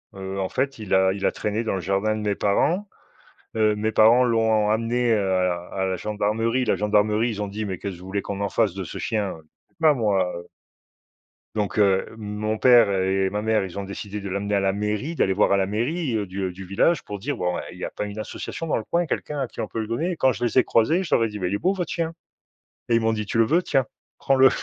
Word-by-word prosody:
heu, 95 0 -5
en 95 - -2
fait 135 +1 -1
il 105 -4 -4
a 95 0 +4
il 100 - -4
a - - +3
traîné 105 +2 -2
dans 110 - -1
le - - -2
jardin 100 +4 0
de - - -4
mes 105 -1 0
parents, 165 - +1 0.7
heu, 110 -1 +3
mes 110 +1 -1
parents 115 +3 +6
l'ont 110 -3 +2
amené, 115 +2 +1
heu, 110 - +3
à 90 -1 0
à 95 -1 -1
la 95 -1 -1
gendarmerie, 110 +4 0
la - - +1
gendarmerie 105 +2 +2
ils 105 -1 -5
ont 105 - -2
dit: 105 +2 -4
«Mais 95 -2 -4
qu'est-ce 95 0 -6
vous 90 - -12
voulez 100 +2 -2
qu'on 100 0 -5
en 100 0 -1
fasse 110 -4 +1
de 95 -1 -5
ce - - -7
chien?» 105 -4 -1 0.5
bah, 155 -2 +6
moi, 100 -8 +1
heu 85 0 -10 1.1
Donc 105 0 -1
heu, 100 -2 +3
mon 110 0 -3
père 120 -4 +6
et 95 0 +1
ma 105 +2 -3
mère, 110 -2 +1
ils 95 -1 -8
ont 100 - -2
décidé 100 +1 -6
de 100 - -6
l'amener 100 +2 -2
à 100 - +3
la 95 0 +1
mairie, 105 +10 -2
d'aller 95 - +2
voir 100 +2 +2
à 100 - +4
la 95 -1 +1
mairie, 125 - -1
heu, 105 -2 0
du, 95 +1 -5
heu, 90 - -2
du 95 +2 -9
village 100 - +2
pour 105 - -7
dire: 135 +9 -3
«Bon, 90 0 -1
eh, - - -7
il - - -12
y - - -4
a - - -4
pas - - -4
une 105 +1 -6
association 165 +8 -6
dans - - +1
le 110 - -3
coin, 170 +8 0
quelqu'un 150 -1 -3
à 130 - -2
qui - - -9
on - - -1
peut 115 - -5
le 110 - -4
donner?» 165 +10 -1
quand 130 -3 +3
je 120 - -4
les 120 - +2
ai 125 - +6
croisés, 155 +11 +2
je 180 - -7
leur 115 - +4
ai - - 0
dit: 105 -1 -7
«Mais 90 - 0
il 95 - -2
est - - 0
beau 185 - +2
votre 180 -4 -3
chien» 165 -1 -2 0.8
et 115 - +4
ils - - +3
m'ont 115 0 +1
dit: 105 -1 -2
«Tu 115 - -2
le 115 - +5
veux, 170 +8 +2
tiens, 135 -6 +1 0.3
prends-le». 135 -1 +5
105 Hz, 270 wpm, -24 LUFS, 100-120 Hz, 1.1 s, parents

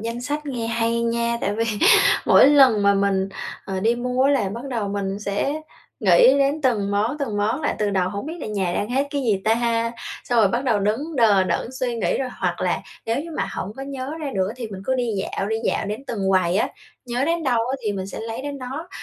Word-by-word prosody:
danh 230 +2 -4
sách 295 +4 -4
nghe 245 -5 -3
hay 230 0 0
nha! 235 0 0
Tại 200 - -1
vì 225 +2 0 0.6
mỗi - - +7
lần 265 -7 +6
mà 200 0 +4
mình, 195 -1 +1 0.4
ờ, 190 -1 -3
đi 230 +3 +2
mua 250 +1 -1
á 280 - +4
là 245 -9 +1
bắt 230 +6 -6
đầu 225 -5 -2
mình 200 0 -3
sẽ 210 +9 -2 0.4
nghĩ - - +6
đến 280 +2 +1
từng 215 -6 +1
món, 220 +8 0
từng 230 -7 -2
món 220 +7 0
lại 295 - -1
từ 210 -1 0
đầu 185 -2 +1
hổng 200 +6 -5
biết 320 - -5
là - - -5
nhà 195 -4 -1
đang 205 - -1
hết 270 +3 +1
cái 285 -1 -2
gì 210 -6 +1
ta? 230 +1 +1 0.3
Xong 240 - -1
rồi 215 -3 +5
bắt 240 +6 -1
đầu 235 -5 +2
đứng 265 +11 -1
đờ 210 -6 +4
đẫn 235 - -2
suy 255 -2 -2
nghĩ 230 - 0
rồi 265 - -2
hoặc - - -1
là - - 0 0.3
nếu 230 +4 0
như 335 - -9
mà - - -1
hổng 195 - -4
có 270 - -6
nhớ 275 0 -5
ra 290 -3 -3
nữa 190 0 0
thì 235 -3 -5
mình 195 -2 -8
cứ 260 - 0
đi 250 -2 -1
dạo, 195 0 -3
đi 220 - 0
dạo - - 0
đến 215 +6 -5
từng 200 -6 -2
quầy 185 -1 +2
á, - - +1 0.4
nhớ 245 +2 -1
đến 335 +1 0
đâu 250 -4 +2
á 265 - -1
thì 210 - 0
mình 190 -1 -4
sẽ - - -7
lấy 225 +3 -5
đến 285 0 -5
đó. 270 +7 -6
230 Hz, 250 wpm, -22 LUFS, 205-265 Hz, 0.6 s, mỗi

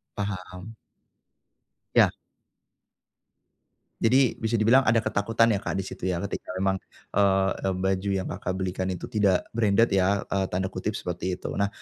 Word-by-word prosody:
Paham. 95 +1 -5 1.2
Ya. - - +6 1.9
Jadi 125 +1 +3
bisa 115 +1 0
dibilang 120 +5 +4
ada 110 0 +3
ketakutan 115 +3 +2
ya 100 - +1
Kak, - - -4
di 95 - -1
situ 95 - -6
ya 90 -1 -1
ketika 100 -2 -5
memang, 95 0 0 0.3
eee, 95 -1 +2
baju 95 +1 -1
yang 95 -1 -2
Kakak, 95 +1 -3
belikan 95 0 -2
itu 90 -2 -5
tidak 100 -4 +2
"branded" 110 0 +3
ya, 95 +1 +2
eee, 95 -1 -1
tanda 95 +1 -2
kutip 100 +3 -3
seperti 90 +1 -3
itu - - -6
nah 100 - +3
95 Hz, 145 wpm, -26 LUFS, 95-110 Hz, 1.9 s, Ya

